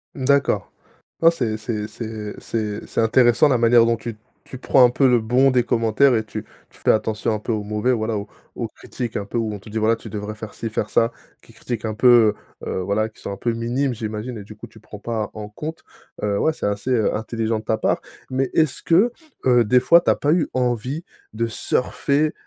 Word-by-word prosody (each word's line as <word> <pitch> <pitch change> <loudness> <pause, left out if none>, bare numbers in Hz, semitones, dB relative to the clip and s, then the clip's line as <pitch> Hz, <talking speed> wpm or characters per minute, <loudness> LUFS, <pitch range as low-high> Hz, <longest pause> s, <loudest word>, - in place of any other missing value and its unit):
D'accord, 140 +1 +1 0.5
ouais, 165 - +8
c'est 120 -10 -2
c'est 110 -1 -4
c'est 110 -2 -6
c'est 105 -2 -3
c'est - - -2
intéressant 120 +4 +4
la 125 - +2
manière 115 0 +5
dont 115 - +3
tu 115 0 -7 0.3
tu 130 - -10
prends 130 0 +5
un 120 - +6
peu 130 +2 +3
le 120 -2 +4
bon 125 +4 +3
des 125 -1 +3
commentaires 120 +2 +3
et 110 - -1
tu 110 0 -6 0.3
tu - - -20
fais - - +2
attention 110 0 +1
un 110 - -1
peu 105 - -3
aux 105 -2 -1
mauvais, 105 +4 0
voilà 110 -2 -1
aux 100 - -6 0.3
aux - - -2
critiques 120 -4 -6
un 100 - -2
peu 105 - -3
où 110 -2 -1
on 105 - -6
te 110 - -14
dit: 110 - -2
«Voilà, 110 +1 +3
tu 115 - -10
devrais 105 0 -5
faire 110 -1 -9
ci, 115 - -4
faire 105 -1 -3
ça.» 115 +1 +2 0.3
qui - - -18
critiquent 115 0 -5
un 110 - -2
peu, 115 -2 +5 0.3
heu, - - -12
heu, - - -2
voilà 100 +4 0
qui 110 - -20
sont - - -5
un 100 - -4
peu 120 - -1
minimes, 120 +4 -1
j'imagine 110 +2 -5
et - - -7
du 105 +1 -12
coup 115 - -10
tu 110 -1 -17
prends 105 -1 -11
pas 110 0 -3
en 105 -1 -7
compte, 155 +9 -7 0.4
heu, 100 -1 0
ouais 160 - +2
c'est 155 - -4
assez, 105 +5 -2
heu, 115 -4 +2
intelligent 110 0 -2
de - - -16
ta 110 - +1
part. - - +1 0.3
Mais, 130 0 -1
est-ce 155 -5 +1
que, 200 +9 +3 0.3
heu, 120 -2 +5
des 125 +3 +4
fois 170 +7 +6
t'as - - +2
pas 145 - +1
eu 170 -2 +2
envie 125 +5 -1 0.3
de 115 +1 0
surfer, 140 +6 0
115 Hz, 235 wpm, -22 LUFS, 110-125 Hz, 0.5 s, ouais